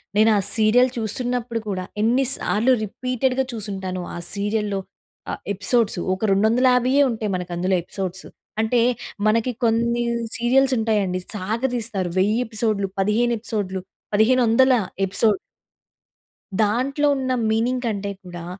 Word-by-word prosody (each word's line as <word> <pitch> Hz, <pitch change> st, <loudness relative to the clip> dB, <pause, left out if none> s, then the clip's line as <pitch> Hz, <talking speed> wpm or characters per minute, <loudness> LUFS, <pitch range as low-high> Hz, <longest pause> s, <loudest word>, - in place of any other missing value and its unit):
నేనా 215 Hz, 0 st, +5 dB, 0.2 s
సీరియల్ 235 Hz, +3 st, +4 dB
చూస్తున్నప్పుడు 235 Hz, +1 st, -2 dB
కూడా 185 Hz, -2 st, -2 dB, 0.2 s
ఎన్ని 250 Hz, +4 st, +3 dB
సార్లు 230 Hz, +5 st, +1 dB
రిపీటెడ్‌గా 255 Hz, +4 st, -1 dB
చూసుంటానో 190 Hz, -4 st, -4 dB
ఆ -, -, -5 dB, 0.2 s
సీరియల్‌లో 205 Hz, 0 st, -1 dB, 0.5 s
ఆహ్, -, -, -6 dB
ఎపిసోడ్సు. 205 Hz, 0 st, +1 dB
ఒక 190 Hz, +4 st, -2 dB
250 250 Hz, +5 st, +3 dB, 0.2 s
ఉంటాయి 220 Hz, -2 st, -3 dB
మనకి 180 Hz, -1 st, -5 dB
అందులో 185 Hz, +2 st, +1 dB
ఎపిసోడ్సు. 190 Hz, +1 st, -5 dB, 0.3 s
అంటే 230 Hz, +2 st, +1 dB, 0.5 s
మనకి 230 Hz, +3 st, +2 dB
కొన్ని 235 Hz, +1 st, +1 dB, 0.4 s
సీరియల్స్ 260 Hz, +3 st, +3 dB
ఉంటాయండి 205 Hz, -5 st, 0 dB, 0.2 s
సాగ 210 Hz, +4 st, -3 dB
తీస్తారు, 210 Hz, -6 st, -1 dB
1000 210 Hz, +5 st, +2 dB
ఎపిసోడ్‌లు, 215 Hz, -3 st, -1 dB
15 220 Hz, +5 st, +2 dB
ఎపిసోడ్‌లు, 200 Hz, -4 st, -3 dB, 0.3 s
1500 245 Hz, +3 st, +4 dB, 0.3 s
ఎపిసోడ్. 200 Hz, +1 st, +2 dB, 1.2 s
దాంట్లో 260 Hz, +7 st, +1 dB
ఉన్న 260 Hz, -1 st, -1 dB, 0.2 s
మీనింగ్ 245 Hz, +3 st, 0 dB
కంటే 200 Hz, -2 st, -2 dB
కూడా 175 Hz, -2 st, -8 dB
220 Hz, 115 wpm, -22 LUFS, 200-245 Hz, 1.2 s, నేనా